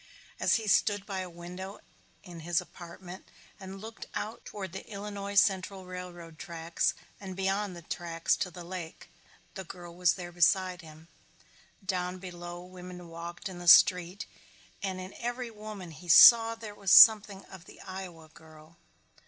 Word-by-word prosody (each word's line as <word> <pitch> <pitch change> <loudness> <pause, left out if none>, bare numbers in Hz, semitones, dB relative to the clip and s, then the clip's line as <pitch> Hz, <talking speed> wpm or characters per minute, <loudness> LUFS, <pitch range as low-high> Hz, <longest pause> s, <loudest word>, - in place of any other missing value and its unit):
As - - +3
he 225 - -2
stood 205 0 +2
by 195 -2 -4
a 185 -1 -5
window 180 +3 -9 0.5
in 175 -4 -11
his 170 +1 0
apartment 175 +1 -11 0.3
and 190 0 -9
looked 220 +2 -9
out 220 +2 -5
toward 190 -4 -7
the 190 - -7
Illinois 200 -1 -6
Central 195 -1 +2
railroad 175 -3 -9
tracks 170 0 -2 0.2
and 190 -2 -8
beyond 195 0 -1
the 170 - -11
tracks 165 0 -1
to 180 - -2
the 175 0 -10
lake, 170 -2 -8 0.4
the 190 - -7
girl 175 -1 -11
was 175 -2 +2
there 175 -2 -8
beside 180 +1 +2
him. 160 0 -15 0.8
Down 180 -1 -2
below 175 -1 -8
women 180 -1 -11
walked 170 +2 -7
in 185 -2 -8
the 175 - -8
street 180 +3 +6 0.6
and 190 -2 -3
in 185 +1 -8
every 240 0 -4
woman 210 -5 -9
he 160 +3 -13
saw 230 +6 +8
there 220 -2 -9
was 200 -2 -5
something 210 -3 +7
of 185 -2 -13
the - - -15
Iowa 185 -4 -9
girl. 155 +1 -17
185 Hz, 160 wpm, -29 LUFS, 175-195 Hz, 0.8 s, saw